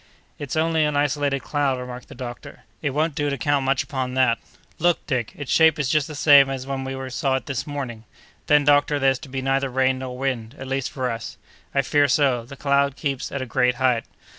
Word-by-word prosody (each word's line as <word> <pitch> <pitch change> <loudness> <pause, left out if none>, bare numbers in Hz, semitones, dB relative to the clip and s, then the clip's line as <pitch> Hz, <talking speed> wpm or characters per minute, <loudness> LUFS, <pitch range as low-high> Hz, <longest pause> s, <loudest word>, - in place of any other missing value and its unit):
"It's 145 -1 -4
only 160 0 +2
an 150 -1 0
isolated 145 -1 0
cloud," 145 -3 0
remarked 125 0 -8
the 140 - -12
doctor. 120 -1 -8 0.2
"It 150 - 0
won't 155 +3 0
do 145 0 -1
to 140 - -2
count 140 +2 +1
much 135 0 +1
upon 130 -1 -4
that." 130 -3 +3 0.4
"Look, 175 +1 +2
Dick, 125 -6 -2
its 145 -3 -6
shape 160 -2 +5
is 145 -4 -1
just 150 0 +2
the 155 - -8
same 140 -2 +6
as 130 -1 -4
when 135 -1 -3
we 130 0 -5
saw 135 0 0
it 130 - -3
this 135 0 -4
morning!" 130 -6 -5 0.4
"Then, 150 0 +5
doctor, 145 0 +4
there's 135 -2 +2
to 145 - -11
be 130 0 -4
neither 135 0 +1
rain 130 0 +1
nor 130 -1 -6
wind, 130 -2 -3
at 135 - -7
least 135 0 -2
for 130 -2 -2
us!" 115 0 -6 0.4
"I 140 - +3
fear 145 +2 +3
so; 135 -3 +2
the 140 +3 -11
cloud 140 0 +1
keeps 140 -4 -3
at 140 -1 -3
a - - -5
great 125 0 +1
height." 125 -2 +1
135 Hz, 225 wpm, -23 LUFS, 130-145 Hz, 0.4 s, same